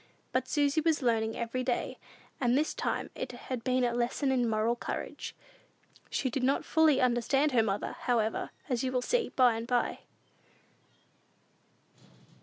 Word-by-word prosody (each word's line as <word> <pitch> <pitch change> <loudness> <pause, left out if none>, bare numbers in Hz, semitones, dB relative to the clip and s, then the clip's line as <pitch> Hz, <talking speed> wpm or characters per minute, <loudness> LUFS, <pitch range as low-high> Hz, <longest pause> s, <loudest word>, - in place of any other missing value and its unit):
But 255 0 0
Susy 290 +2 +2
was 310 -3 +1
learning 225 -2 +1
every 235 +2 -2
day, 245 -1 -2 0.4
and 245 0 +3
this 305 +2 +1
time - - -2
it - - -5
had 250 -3 -5
been 255 -1 +1
a 240 -1 +1
lesson 245 +3 0
in 245 -3 +2
moral 220 +2 +1
courage. - - -5 0.7
She 265 - -1
did 260 +1 -2
not 265 +2 +1
fully 315 -4 +4
understand 255 +4 +2
her 240 -3 +4
mother, 205 -2 -2
however, 225 -3 0 0.2
as 250 -3 -1
you 255 - 0
will 250 -1 0
see 480 - +1
by 250 -3 +4
and 225 +1 -4
by. 245 -1 0
250 Hz, 155 wpm, -30 LUFS, 235-270 Hz, 0.7 s, fully